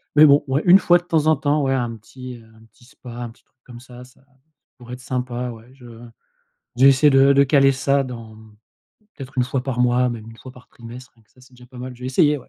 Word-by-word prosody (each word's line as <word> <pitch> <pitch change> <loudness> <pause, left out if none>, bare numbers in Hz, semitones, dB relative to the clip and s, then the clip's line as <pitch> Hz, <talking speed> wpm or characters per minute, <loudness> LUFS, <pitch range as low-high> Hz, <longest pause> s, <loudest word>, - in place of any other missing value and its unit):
Mais 150 +1 +7
bon, 145 -1 +4
ouais, 135 +2 -1
une 180 +2 +7
fois 175 -2 +4
de 175 - -10
temps 160 -3 -1
en 160 - +4
temps, 145 +1 -1
ouais, 135 0 0
un 120 -3 -3
petit, 125 +3 -11
heu, 115 - -18
un 110 - -20
petit 120 - -25
spa, 125 0 -15
un 120 0 -7
petit 115 - -21
truc - - -48
comme 120 -1 -13
ça, 125 -1 -14 0.8
pourrait 120 0 -10
être 125 - -12
sympa, 125 -1 -5
ouais 115 +1 -14
je 130 -3 -17 0.9
je 125 - -1
vais 135 - +8
essayer 140 +3 +3
de 135 0 +4
de 140 0 +4
caler 135 0 +3
ça 140 +1 0
dans 115 -4 -10 0.8
peut-être 135 -1 -10
1 125 - +2
fois 125 +1 -3
par 130 -2 -5
mois, 125 0 +2
même 115 -1 -8
1 115 - -15
fois 125 +4 -13
par 125 -1 -19
trimestre, 120 +2 -13
rien 115 - -28
que - - -40
ça, 130 - -25
c'est 130 0 -21
déjà 125 0 -17
pas 125 0 -15
mal. 125 0 -8
Je - - -22
vais 125 - -5
essayer, 150 +3 +2
ouais. - - -18
125 Hz, 265 wpm, -20 LUFS, 120-135 Hz, 0.9 s, vais